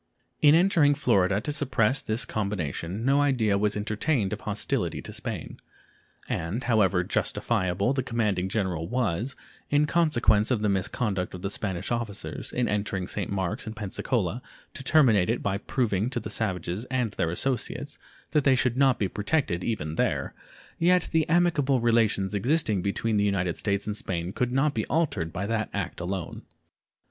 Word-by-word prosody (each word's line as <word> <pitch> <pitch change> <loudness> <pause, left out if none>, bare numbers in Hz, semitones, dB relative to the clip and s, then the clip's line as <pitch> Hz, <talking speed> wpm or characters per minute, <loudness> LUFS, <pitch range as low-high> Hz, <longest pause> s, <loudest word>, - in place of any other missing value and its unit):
In 150 +1 +7
entering 165 -5 +4
Florida 100 -8 +2
to 150 - -3
suppress 135 -3 +1
this 110 +2 0
combination 100 0 -3
no 140 +2 +4
idea 125 -8 +2
was 105 +1 +1
entertained 105 +1 0
of - - -5
hostility - - -2
to - - -8
Spain, - - -5 0.7
and 95 +10 -2
however 100 -7 +3
justifiable 95 +5 0
the 135 - 0
commanding 105 -7 -1
general 95 -6 -1
was, 120 +2 -1 0.3
in 145 +1 +3
consequence 120 -10 +3
of 115 -5 0
the 105 - +2
misconduct 95 0 -1
of 90 - -9
the 100 - -2
Spanish 95 -2 -3
officers, 115 -4 -4
in 125 -1 0
entering 100 -3 -2
St. 100 -4 -3
Marks 95 +1 -2
and 110 - -5
Pensacola 105 +1 -2 0.3
to 140 - -5
terminate 120 - +4
it - - 0
by 100 -1 0
proving 110 -2 0
to 125 - -2
the 110 -1 -6
savages 95 -1 -1
and 125 -4 -1
their 85 - -1
associates 125 +9 -2 0.3
that 150 - +2
they 135 -1 +5
should 125 -1 +1
not 135 -2 +4
be 100 - 0
protected 105 - -1
even 80 -9 -3
there, - - 0 0.5
yet 180 +1 +3
the 160 -1 +1
amicable 155 -6 +3
relations 115 -4 +2
existing 110 - +1
between 105 +3 0
the 100 - +3
United 90 -4 0
States 100 -1 -1
and 105 - -3
Spain 90 -3 -3
could 125 +2 -1
not 135 +3 +2
be 110 - -1
altered 135 - 0
by 95 +4 -3
that 110 0 -1
act 100 -3 -3
alone. 90 -1 -4
110 Hz, 165 wpm, -27 LUFS, 95-130 Hz, 0.7 s, In